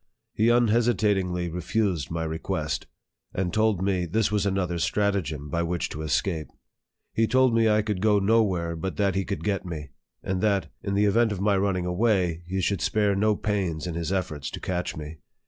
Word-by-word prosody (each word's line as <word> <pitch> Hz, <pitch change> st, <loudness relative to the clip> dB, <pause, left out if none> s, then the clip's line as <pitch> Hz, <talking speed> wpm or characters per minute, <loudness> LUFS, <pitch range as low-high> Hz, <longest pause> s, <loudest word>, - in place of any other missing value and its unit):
He 110 Hz, +2 st, +3 dB
unhesitatingly 105 Hz, -6 st, +2 dB
refused 90 Hz, -3 st, -1 dB
my 80 Hz, 0 st, -2 dB
request, 80 Hz, 0 st, -3 dB, 0.5 s
and 90 Hz, -1 st, -1 dB
told 110 Hz, -4 st, +2 dB
me 95 Hz, -3 st, 0 dB
this 105 Hz, +4 st, +1 dB
was 105 Hz, -1 st, +1 dB
another 90 Hz, -3 st, -1 dB
stratagem 85 Hz, -6 st, 0 dB
by 85 Hz, +4 st, -1 dB
which 85 Hz, 0 st, -1 dB
to 75 Hz, -, -6 dB
escape. 80 Hz, +1 st, -1 dB, 0.7 s
He 115 Hz, 0 st, +2 dB
told 130 Hz, +1 st, +4 dB
me 115 Hz, -1 st, +4 dB
I 105 Hz, 0 st, +3 dB
could 105 Hz, -4 st, -2 dB
go 105 Hz, -1 st, +4 dB
nowhere 95 Hz, -5 st, +2 dB
but 90 Hz, +3 st, -4 dB
that 100 Hz, -2 st, +2 dB
he 95 Hz, +1 st, 0 dB
could 100 Hz, +1 st, -4 dB
get 100 Hz, -3 st, 0 dB
me; 75 Hz, -6 st, -6 dB, 0.3 s
and 95 Hz, -1 st, -2 dB
that, 100 Hz, -2 st, +1 dB
in 100 Hz, -1 st, -2 dB
the 105 Hz, +1 st, +3 dB
event 110 Hz, +2 st, +3 dB
of 100 Hz, -, -3 dB
my 100 Hz, +1 st, +2 dB
running 95 Hz, -2 st, 0 dB
away, 90 Hz, -3 st, +1 dB
he 95 Hz, +1 st, -1 dB
should 95 Hz, -1 st, 0 dB
spare 105 Hz, -2 st, +2 dB
no 105 Hz, +2 st, +2 dB
pains 95 Hz, -8 st, -2 dB
in 90 Hz, -, -3 dB
his 85 Hz, +1 st, -3 dB
efforts 90 Hz, -8 st, -2 dB
to -, -, -7 dB
catch 90 Hz, -4 st, -3 dB
me. 75 Hz, +1 st, -7 dB
95 Hz, 190 wpm, -26 LUFS, 85-105 Hz, 0.7 s, told